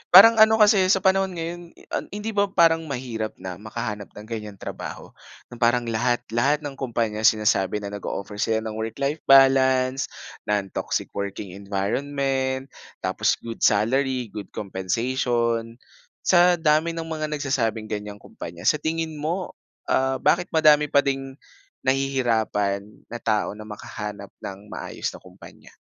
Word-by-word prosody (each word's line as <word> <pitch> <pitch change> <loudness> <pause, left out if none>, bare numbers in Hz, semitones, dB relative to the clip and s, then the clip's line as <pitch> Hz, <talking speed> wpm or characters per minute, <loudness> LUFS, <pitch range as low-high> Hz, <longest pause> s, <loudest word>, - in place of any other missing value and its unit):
Parang 225 +4 +10
ano 220 0 +7
kasi 205 -3 +5
sa 190 0 +3
panahon 190 -1 +2
ngayon, 170 +1 -4
i - - -18
ah, - - -2
hindi 210 +2 -5
ba 200 -1 +2
parang 165 -3 +3
mahirap 120 -5 -4
na 90 0 -7
makahanap 105 -1 -5
ng 105 - -9
ganyang 105 -3 -6
trabaho, - - -8 0.4
na 120 - -10
parang 120 +1 +3
lahat 120 +1 0
lahat 140 +6 +2
ng 140 -2 -7
kumpanya 115 -4 -1
sinasabi 105 -1 +2
na 100 - -5
nag-o-offer 100 0 -5
sila 110 +1 +1
ng 110 - -4
work-life 140 +7 -2
balance, 135 -1 +5 0.4
non-toxic 100 -2 -2
working 100 -1 -5
environment, 130 +7 -2 0.3
tapos - - +1
good 115 -1 -6
salary, 125 +2 +2
good 105 -3 -7
compensation. 115 +4 -1 0.5
Sa 175 0 +5
dami 160 +1 +2
ng 165 - -3
mga 155 -1 -3
nagsasabing 125 -8 -2
ganyang 105 -1 -5
kumpanya, 85 +1 -9
sa 150 +9 +3
tingin 160 -1 -3
mo, 170 +5 -2 0.4
ah, 135 0 +2
bakit 175 +6 +2
madami 150 -1 +6
pa 140 0 +3
ding 135 -1 -3 0.5
nahihirapan 115 -7 0
na 120 - -5
tao, 110 -2 0
na 110 +1 -10
makahanap 105 -1 -7
ng 95 0 -7
maayos - - -4
na - - -11
kumpanya? - - -15
130 Hz, 145 wpm, -24 LUFS, 105-150 Hz, 0.5 s, Parang